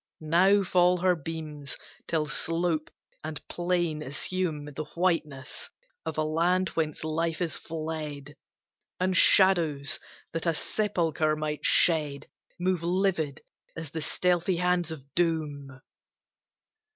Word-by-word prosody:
Now 185 +6 +4
fall 180 -1 +4
her 180 0 +3
beams 155 -3 -6 0.3
till 160 -2 +1
slope 165 +1 -1 0.3
and 155 -1 -4
plain 175 -3 -1
assume 150 +2 -2
The 150 +1 -6
whiteness 155 -6 -1 0.4
of - - -3
a 155 - +2
land 170 +4 +2
whence 155 -2 -2
life 160 +1 -1
is 175 -3 -1
fled; 155 -3 -5 0.6
And 185 0 +1
shadows 170 -8 +5 0.3
that 165 +1 -3
a 165 - +2
sepulcher 165 -6 0
might 150 -1 -3
shed 150 -4 +3 0.3
Move 180 -1 +1
livid 175 -5 0 0.3
as 165 -3 -6
the 160 - -4
stealthy 175 +3 +1
hands 180 -1 +1
of 155 -4 -7
doom. 150 -6 -1
165 Hz, 115 wpm, -28 LUFS, 150-180 Hz, 0.6 s, shadows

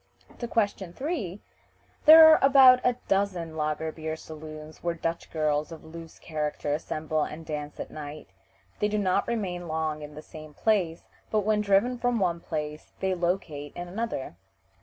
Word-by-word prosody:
To 240 - -3
question 200 -6 -1
3: 240 - -3 0.7
"There 320 +1 +11
are 315 - +7
about 265 -2 +8
a 250 - +3
dozen 185 -5 0
lager 155 +1 -2
beer 155 0 -5
saloons 155 -1 -10
where 170 -1 -1
Dutch 165 0 -3
girls 150 -1 0
of 165 - -9
loose 165 0 -10
character 150 -2 -3
assemble 155 0 -2
and 155 +2 -4
dance 150 -2 -5
at - - -6
night. 150 0 -8 0.5
They 210 - +2
do 210 0 -1
not 190 -3 +1
remain 185 -7 -3
long 155 -1 -2
in 150 0 -9
the 155 - -9
same 155 -1 -12
place, 185 -7 +1 0.3
but 215 - +2
when 210 +1 +1
driven 210 +5 +2
from 245 -1 +1
one 175 -5 0
place 150 -2 -5
they 190 -1 0
locate 170 -5 -2
in 175 0 -6
another." 185 - -4
170 Hz, 165 wpm, -27 LUFS, 155-205 Hz, 0.7 s, There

